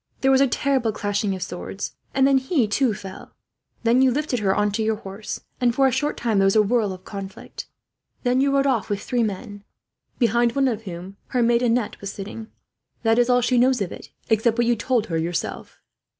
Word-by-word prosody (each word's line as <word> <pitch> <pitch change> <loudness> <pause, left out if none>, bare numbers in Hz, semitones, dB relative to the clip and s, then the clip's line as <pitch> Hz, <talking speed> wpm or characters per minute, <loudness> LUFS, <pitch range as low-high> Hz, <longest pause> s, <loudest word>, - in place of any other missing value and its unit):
There 270 - +4
was 265 0 +5
a 275 - +5
terrible 260 -2 +1
clashing 205 -1 -1
of 185 - -4
swords; 190 +2 -6 0.2
and 270 0 +4
then 270 -1 +4
he, 265 -3 +1
too, 225 +1 +1
fell. 190 -1 -10 0.5
Then 235 +2 +4
you 265 - +5
lifted 270 -1 -1
her 195 -2 +1
on 210 0 +1
to 205 - -2
your 220 0 +1
horse, 205 0 -7 0.2
and 240 -1 +2
for 270 - +4
a 265 - +4
short 295 +4 -1
time 225 -4 +1
there 195 - +4
was 195 - +2
a 215 - +6
whirl 215 -1 +1
of 185 0 -9
conflict. 195 -1 -8 0.6
Then 250 +1 +2
you 275 0 +2
rode 275 0 +2
off 255 -6 +1
with 205 -1 -1
three 245 -2 0
men, 205 -1 -4 0.5
behind 235 -1 +2
one 275 -1 +3
of 225 -3 -2
whom 185 +2 -8
her 250 -2 +1
maid 235 0 +3
Annette 240 -2 0
was 200 0 -4
sitting. 215 +3 -7 0.6
That 225 +1 +3
is 245 +1 +3
all 250 0 +4
she 245 0 +2
knows 255 +1 +3
of 195 -4 -2
it, - - -10 0.2
except 225 +1 +2
what 240 - +3
you 240 0 +3
told 230 0 0
her, 165 -2 -2
yourself." 170 +1 -4
230 Hz, 220 wpm, -23 LUFS, 205-255 Hz, 0.6 s, a